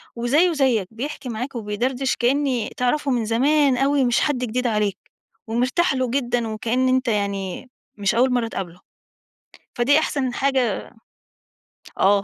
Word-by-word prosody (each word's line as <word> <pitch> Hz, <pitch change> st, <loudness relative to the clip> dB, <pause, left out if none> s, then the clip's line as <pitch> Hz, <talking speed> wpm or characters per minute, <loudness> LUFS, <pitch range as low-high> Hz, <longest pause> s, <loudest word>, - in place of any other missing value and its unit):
وزيه 285 Hz, +10 st, +2 dB
زيك، 255 Hz, -9 st, +1 dB
بيحكي 265 Hz, +3 st, -6 dB
معاك 245 Hz, +4 st, -5 dB
وبيدردش 245 Hz, +5 st, -1 dB
كأني 255 Hz, -2 st, 0 dB
تعرفه 275 Hz, +3 st, 0 dB
من 240 Hz, -3 st, 0 dB
زمان 270 Hz, +4 st, +3 dB
أوي 275 Hz, +1 st, +2 dB
مش 240 Hz, -1 st, +2 dB
حد 290 Hz, -3 st, +1 dB
جديد 250 Hz, 0 st, -1 dB
عليك، 210 Hz, -3 st, 0 dB, 0.5 s
ومرتاح 250 Hz, +9 st, +1 dB
له 255 Hz, -1 st, 0 dB
جدًا 245 Hz, -2 st, -1 dB
وكأن 230 Hz, +4 st, 0 dB
أنت 255 Hz, 0 st, +1 dB
يعني، 200 Hz, 0 st, -2 dB, 0.3 s
مش 200 Hz, 0 st, 0 dB
أوّل 255 Hz, +2 st, +3 dB
مرّة 240 Hz, -2 st, +1 dB
تقابله، 180 Hz, -5 st, -6 dB, 1.0 s
فدي 280 Hz, +6 st, +4 dB
أحسن 265 Hz, -5 st, -1 dB
حاجة 260 Hz, -6 st, 0 dB, 1.2 s
آه، 200 Hz, +1 st, +3 dB
245 Hz, 135 wpm, -22 LUFS, 225-270 Hz, 1.2 s, فدي